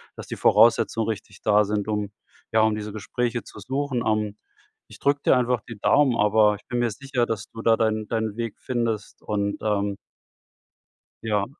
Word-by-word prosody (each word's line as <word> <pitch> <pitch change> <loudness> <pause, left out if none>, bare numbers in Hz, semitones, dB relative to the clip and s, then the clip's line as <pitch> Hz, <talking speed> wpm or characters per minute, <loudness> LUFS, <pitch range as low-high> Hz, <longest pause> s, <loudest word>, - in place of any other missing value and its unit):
dass - - -9
die - - -5
Voraussetzungen 115 -1 +4
richtig 105 -2 -6
da 105 0 +4
sind, 105 0 -2
um, 105 -1 -2 0.4
ja 110 - +4
um 110 -1 +3
diese 105 -1 -6
Gespräche 120 +3 -2
zu - - -14
suchen. 135 -3 -2
Ähm, 105 -1 0 0.5
ich - - -14
drücke 140 0 +1
dir - - +6
einfach 125 -2 +1
die 115 -4 -9
Daumen, 135 +2 +4
aber 105 0 +4
ich - - -26
bin 120 - -2
mir 120 -1 +1
sicher, 130 +1 -1
dass 110 -2 -4
du 115 - -9
da 115 - +5
deinen 110 -1 0
deinen 110 -1 -2
Weg 115 -2 -4
findest 115 -4 -3
und 100 -1 -1
ähm 100 -2 0 1.3
ja. 105 -3 +1
110 Hz, 180 wpm, -24 LUFS, 105-120 Hz, 1.3 s, dir